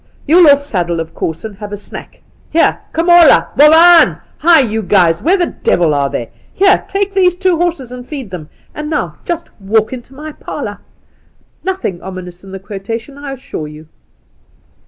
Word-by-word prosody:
You'll 330 +1 +6
off 285 0 +4
saddle, 175 - -2
of 165 0 -6
course, 160 +5 -4
and 215 -2 -7
have 210 0 -8
a" 205 - -5
snack. 205 - -11 0.3
Here, 330 - +2
Komola! 340 -1 +5
Bovaan! 325 +4 +6 0.2
Hi, 335 +1 +5
you 225 -4 0
boys! 175 -4 +2
Where 365 +5 +2
the 355 - +1
devil 170 - 0
are 140 -1 0
they? 120 -3 -5 0.2
Here, 390 +1 +3
take 395 0 -2
these 365 -2 +2
horses 340 -8 0
and 250 0 -8
feed 260 - -8
them. 165 -5 -8 0.2
And 300 0 -6
now 310 - -3
just 340 -1 -4
' - - -37
walk 215 +4 0
into 255 +1 -10
my 305 +2 -8
parlour.' - - -7 0.8
Nothing 370 - -3
ominous 180 -1 -9
in 195 - -12
the 195 - -6
quotation, 210 +6 -7
I 285 -1 -7
assure 245 - -7
you." 150 +1 -13
255 Hz, 175 wpm, -14 LUFS, -, 0.8 s, You'll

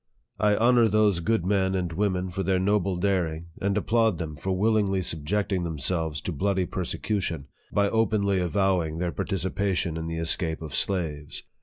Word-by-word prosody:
I 105 -1 +3
honor 120 +1 +4
thdso 105 -5 +2
good 110 -2 +1
men 95 -1 +1
and 90 -3 -2
women 95 -1 0
for 90 +2 -3
their 95 0 +1
noble 95 0 +1
daring, 85 -4 -1
and 100 +1 0
ap 105 - -1
plaud 110 -3 +2
them 80 -2 -5
for 95 +6 -4
willingly 100 -1 +1
subjecting 90 +4 -1
themselves 80 -1 -1
to - - -4
bloody 95 +3 0
persecution, 90 -3 -3 0.3
by 100 0 +2
openly 100 -3 +1
avowing 90 -3 +1
their 90 0 -1
participa 95 +1 -1
tion 85 -2 -1
in 80 0 -4
the 80 0 -4
escape 80 0 0
of 75 - -7
slaves. 75 -6 -1
95 Hz, 170 wpm, -26 LUFS, 85-100 Hz, 0.3 s, honor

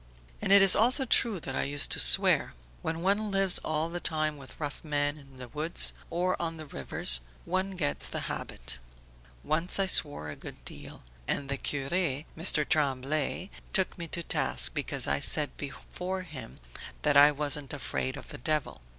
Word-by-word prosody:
"And - - -1
it 200 0 +9
is 195 - +12
also 255 +5 +2
true 230 -4 +2
that 135 - -5
I - - 0
used 145 +1 +1
to - - +1
swear. - - +4 0.3
When 165 +1 -4
one 205 +3 0
lives 195 -2 +4
all 155 +1 -2
the 175 +1 -5
time 155 -2 -1
with 140 -2 -14
rough 145 -3 -6
men 145 -1 -1
in 135 -2 -18
the 125 -1 -9
woods 155 +6 0 0.2
or 180 +2 -1
on 165 -1 -4
the 155 - -8
rivers 65 - +2 0.2
one 185 +2 -2
gets 145 -6 -3
the - - -5
habit. - - -4 0.6
Once 165 +4 +2
I 195 - +1
swore 145 - +3
a 75 - -7
good - - -12
deal, 70 +3 -9 0.2
and 140 - -1
the 140 - -1
cure, 135 0 -4 0.4
Mr. 160 -3 +1
Tremblay, 145 +5 -1 0.2
took 190 -2 +1
me 170 - -6
to 170 +1 -4
task - - 0
because - - -2
I 70 0 -1
said 150 -2 +3
before 180 +6 -6
him 135 -9 -10 0.5
that 145 -1 +2
I 145 +1 +7
wasn't 145 -1 -3
afraid 130 -2 -4
of - - -11
the - - -9
devil. 150 - -3
150 Hz, 180 wpm, -28 LUFS, 140-180 Hz, 0.6 s, is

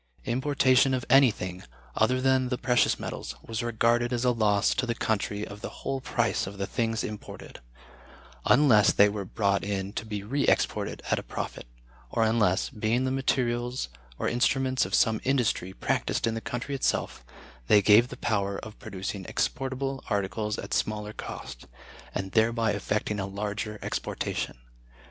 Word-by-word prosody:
Importation 130 0 +3
of 125 - -3
anything, 100 -9 +4 0.3
other 125 +4 +2
than 130 -1 +2
the 125 - -1
precious 125 -1 +2
metals, - - -5
was 115 +1 -3
regarded 120 +1 +1
as 125 0 0
a 125 - +5
loss 105 -4 +2
to 125 - -1
the 115 - -1
nation 105 -1 -1
of 105 +1 -10
the - - -4
whole 135 -1 -4
price - - 0
of 100 +1 -8
the 100 - -2
things 115 +2 -1
imported; 105 -1 -8 0.9
unless 125 -7 +6
they 100 - +6
were 100 -1 -3
brought 100 +1 0
in 100 -1 -3
to 110 - -3
be 105 -2 -5
re 140 +7 -1
exported - - 0
at - - +3
a - - -5
profit, - - -6 0.4
or 115 - +1
unless, 110 -4 +2
being 110 +4 0
the 130 - 0
materials 125 - 0 0.3
or - - -1
instruments 130 +2 +1
of - - 0
some 110 -1 +3
industry 125 -8 +1
practiced - - -1
in 115 - 0
the 115 - -4
country 120 +5 -4
itself, 130 - -1 0.4
they 105 - +7
gave 110 +4 +6
the - - -9
power 100 -3 -1
of 110 -1 -9
producing 95 +1 -5
exportable 135 +4 -2
articles 100 +1 -1
at - - -5
smaller 105 0 -1
cost, 65 - -8 0.5
and 95 0 -3
thereby 115 0 +2
effecting 105 +1 -1
a 100 - -2
larger 105 +2 -4
exportation. - - -3
110 Hz, 165 wpm, -27 LUFS, 105-125 Hz, 0.9 s, they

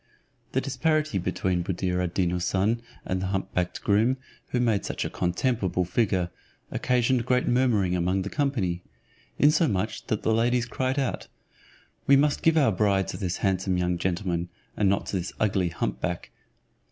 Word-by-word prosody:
The 130 - +2
disparity 155 - 0
between 90 0 -1
Buddir 90 0 -1
ad 90 -1 -3
Deen 90 -2 +2
Houssun 95 +6 0 0.2
and 95 0 -1
the 95 - -1
hump 95 0 -2
backed 90 -1 -2
groom, 110 +6 +3 0.3
who 125 - -1
made 115 -5 +2
such - - -3
a - - -4
contemptible 95 -1 0
figure, 90 -2 0 0.4
occasioned 125 0 +1
great 125 0 +2
murmuring 115 -8 +2
among 90 +2 +1
the 100 - -4
company; 110 -12 0 0.6
insomuch 140 - +2
that 110 - -1
the 110 - +2
ladies 120 +2 +2
cried 130 +3 -2
out, 135 -3 -1 0.8
"We 140 - +7
must 145 +1 +3
give 165 0 +4
our 135 -7 +4
bride 100 -2 +2
to - - -4
this 90 -3 -2
handsome 95 -1 +1
young 90 -1 0
gentleman, 85 -1 -1 0.3
and 100 -2 +2
not 100 - +1
to 100 - -2
this 90 0 -4
ugly 95 -4 +1
humpback." 85 +1 -3
100 Hz, 165 wpm, -26 LUFS, 90-125 Hz, 0.8 s, We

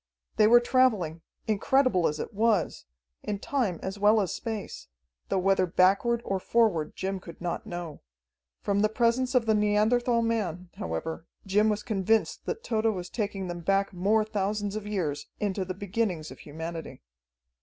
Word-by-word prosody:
They 215 - +6
were 240 +2 +8
traveling 225 -10 +2 0.2
incredible 220 -2 +2
as 150 0 -3
it - - -5
was 215 -3 +1 0.4
in 205 - -3
time 210 - -1
as 190 +2 -4
well 210 +2 +5
as 195 -4 -1
space, 215 - -5 0.4
though - - +1
whether 190 0 +2
backward 200 +7 +3
or 195 -1 -1
forward 210 -7 +1
Jim 190 0 -3
could 170 -2 -12
not 175 -1 -4
know. 175 -4 -6 0.6
From 200 0 +1
the 215 +1 +3
presence 240 +3 +1
of 245 -2 +4
the 220 - +3
Neanderthal 220 +3 +2
man, 185 -6 -2
however, 120 - -4 0.2
Jim 210 +3 +3
was 210 0 -1
convinced 220 -1 0
that 455 - -3
Tode 220 -2 -1
was 190 -5 -1
taking 200 -4 -3
them 175 0 -5
back 195 +3 +1
more 210 +4 +2
thousands 205 -1 -2
of 215 -1 -5
years, 170 -9 -2
into 200 -2 -1
the 185 0 -5
beginnings 190 -5 -2
of - - -11
humanity. 160 - -7
200 Hz, 165 wpm, -28 LUFS, 180-220 Hz, 0.6 s, were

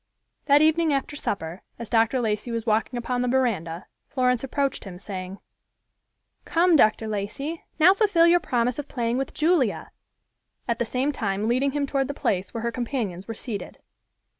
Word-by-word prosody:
That 290 +1 +5
evening 315 0 +3
after 275 +1 -1
supper, 175 - -4 0.2
as 235 - -7
Dr. 230 +3 +2
Lacey 215 0 -1
was 230 -1 -3
walking 225 +2 0
upon 245 +1 -2
the 250 - 0
veranda, 200 -10 0 0.2
Florence 250 -2 +1
approached 275 +1 -1
him, 185 -3 -9
saying, 185 0 -7 1.1
"Come, 345 +1 +3
Dr. 220 -4 +3
Lacey, 215 +10 -4 0.2
now 340 +4 +7
fulfill 395 -6 +4
your 345 +1 +5
promise 245 -3 0
of 290 - -5
playing 240 0 -1
with 270 - -4
Julia," 310 - +1 0.8
at 235 -1 -1
the 240 - +1
same 260 +5 0
time 205 -5 -2
leading 260 +3 +1
him 290 -1 0
toward 275 -1 0
the 285 - -5
place 190 -7 -1
where 230 -1 -5
her 235 - 0
companions 230 -7 -3
were 225 - -5
seated. 215 -2 -6
245 Hz, 170 wpm, -25 LUFS, 215-280 Hz, 1.1 s, now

